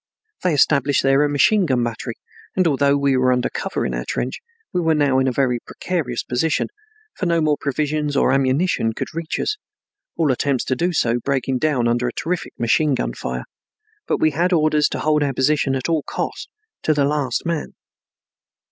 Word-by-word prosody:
They 180 -4 +1
established 140 -1 +3
there 135 +1 +4
a 150 - +2
machine 175 +7 +3
gun 125 -4 +1
battery, 115 0 -4 0.4
and, 185 - +2
although 140 -2 +3
we 140 -1 +2
were 130 0 +3
under 125 -1 +1
cover - - -3
in - - -2
our - - -2
trench, 125 - -3 0.3
we 180 - +1
were 160 -1 +2
now 140 -3 +3
in 130 - +1
a - - +2
very 125 -2 +1
precarious 140 -5 -3
position, 140 +6 0 0.4
for 185 - -3
no 170 -1 +2
more 155 -2 +2
provisions 150 +1 -1
or - - +3
ammunition 135 -2 +1
could - - -5
reach 165 0 -3
us, 425 - -1 0.6
all 160 -4 +2
attempts 130 0 0
to 130 - -1
do 175 +7 0
so 120 -7 +1
breaking 135 -2 0
down 135 -6 +1
under 120 +1 +1
a 120 - -3
terrific 175 +1 -3
machine 135 +5 +2
gun - - -2
fire, 65 0 -4 0.6
but - - +1
we 155 - +2
had 175 +5 0
orders 155 -3 +3
to - - -4
hold 150 0 +2
our 140 -2 0
position 135 +1 +1
at 130 - -2
all 165 -2 +1
cost - - -5
and 435 +1 -54
to 155 - +4
the 145 -1 +2
last 140 -3 -1
man. 165 -2 -2
140 Hz, 200 wpm, -21 LUFS, 130-155 Hz, 0.6 s, there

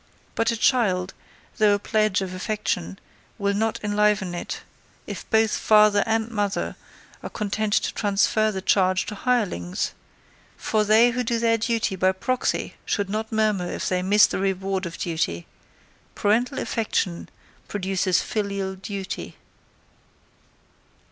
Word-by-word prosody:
But 230 - +1
a 230 - 0
child, 200 -6 +2 0.5
though 210 -1 +5
a - - 0
pledge 215 -1 +1
of 185 -1 -6
affection, 185 - -3 0.4
will 200 0 0
not 220 +2 0
enliven 210 -3 +1
it, 175 - -5 0.4
if - - -7
both 220 -1 +3
father 210 -1 +5
and 225 +1 0
mother 205 -2 -1 0.5
are - - -6
content 215 0 -2
to - - +1
transfer 215 +1 +2
the 190 -2 -5
charge 185 -1 +2
to - - -5
hirelings; 205 - -1 0.7
for 215 -1 +1
they 220 +3 +5
who 250 +1 -1
do 235 0 0
their 230 0 +2
duty 225 -3 0
by 185 +1 +2
proxy 255 +7 -2
should 200 -2 -1
not 220 +1 -3
murmur 215 -5 +1
if - - -3
they 180 -1 0
miss 205 +3 +5
the - - -3
reward 195 -1 -1
of 170 - -8
duty 160 - -2 0.7
parental 240 +6 +1
affection 200 -6 -2 0.4
produces 190 -2 0
filial 200 -2 -2
duty. 195 0 -6
205 Hz, 135 wpm, -24 LUFS, 190-220 Hz, 0.7 s, though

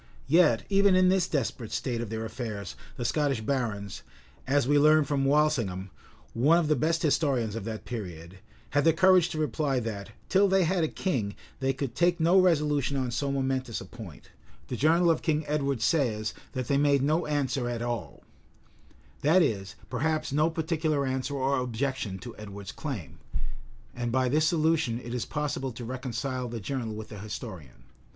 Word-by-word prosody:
Yet 150 -5 +4
even 200 -1 +4
in 185 0 +5
this 185 -1 +2
desperate 125 - -2
state 120 -3 -2
of 120 - -5
their 110 0 -3
affairs 110 -3 -5 0.2
the 120 - -3
Scottish 140 -3 +1
barons, 110 -5 -2 0.5
as 140 -1 +2
we 145 +1 +4
learn 155 +1 +6
from 140 -1 0
Walsingham,[*] 125 -11 +1 0.4
one 145 +9 +4
of 170 -3 +1
the 150 - +3
best 160 +5 0
historians 135 -8 +1
of 115 -3 -5
that 110 -1 -5
period, 90 -5 -7 0.3
had 145 +1 +2
the 165 - +5
courage 185 0 +5
to 160 - -5
reply 145 -2 0
that, 105 -4 -5 0.2
till 195 +1 +4
they 190 -1 +3
had 175 0 +1
a - - +2
king, 125 - -2 0.2
they 135 0 +1
could 135 -2 -4
take 175 +4 +2
no 170 +4 +5
resolution 150 -6 +2
on 130 -2 -1
so 140 +4 -1
momentous 130 -3 -1
a - - -8
point: 110 -10 -11 0.4
the - - -2
journal 165 +6 +4
of 160 - 0
King 155 -1 0
Edward 140 -5 -1
says, 115 -7 +1 0.2
that 130 -3 -3
they 140 -1 +2
made 140 -2 +3
no 155 +4 +1
answer 135 -4 0
at 120 -1 -3
all;[] 120 -3 -4 1.0
that 165 +5 +5
is, 100 -9 -2
perhaps, 155 +6 -1
no 155 +3 +3
particular 160 -3 0
answer 130 +2 -2
or 135 0 +1
objection 125 -4 -2
to 120 +4 -9
Edward's 100 -2 -8
claim: 115 - -6 0.8
and 120 -1 -2
by 130 +1 +2
this 155 +4 +3
solution 160 -7 +1
it 120 -1 -7
is 120 -3 -2
possible 145 -3 -2
to 120 0 -8
reconcile 130 +1 -3
the 115 0 -5
journal 115 0 -3
with 110 0 -7
the 105 - -8
historian. 95 - -8
135 Hz, 180 wpm, -28 LUFS, 115-155 Hz, 1.0 s, learn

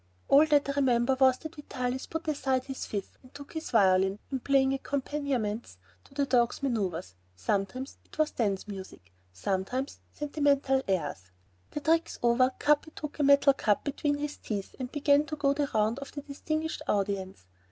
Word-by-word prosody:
All 290 +3 +7
that 290 -2 +3
I - - 0
remember 255 -1 +3
was 260 -1 +5
that 315 +2 -8
Vitalis 255 -3 -4
put 320 0 -5
aside 265 -4 0
his 265 0 -6
fife 200 -2 -5
and 255 - -18
took 285 0 -10
his 320 -1 -5
violin 190 -2 +4
and 265 -2 -3
played 270 -1 +3
accompaniments 270 - -2 0.3
to 275 - -20
the 280 0 +2
dogs' 245 0 +2
maneuvers; 200 - -1 0.2
sometimes 195 - -2
it - - -18
was 310 -1 +2
dance 200 -4 -1
music, 190 - -9 0.2
sometimes 195 - -2
sentimental 285 -2 +1
airs. 145 - -2 0.4
The 295 - -5
tricks 325 +2 +1
over, 240 +2 +4
Capi 295 +1 +2
took 300 0 -7
a - - +3
metal 280 0 +6
cup 210 -6 +1
between 290 0 -1
his 295 0 -4
teeth 200 -3 -5
and 250 -1 -4
began 290 0 +4
to 305 - -4
go 285 -2 +2
the 285 0 -1
round 220 +1 +1
of 280 - -8
the 285 - -5
"distinguished 310 +2 -3
audience." 195 - -1
265 Hz, 175 wpm, -29 LUFS, 210-285 Hz, 0.4 s, All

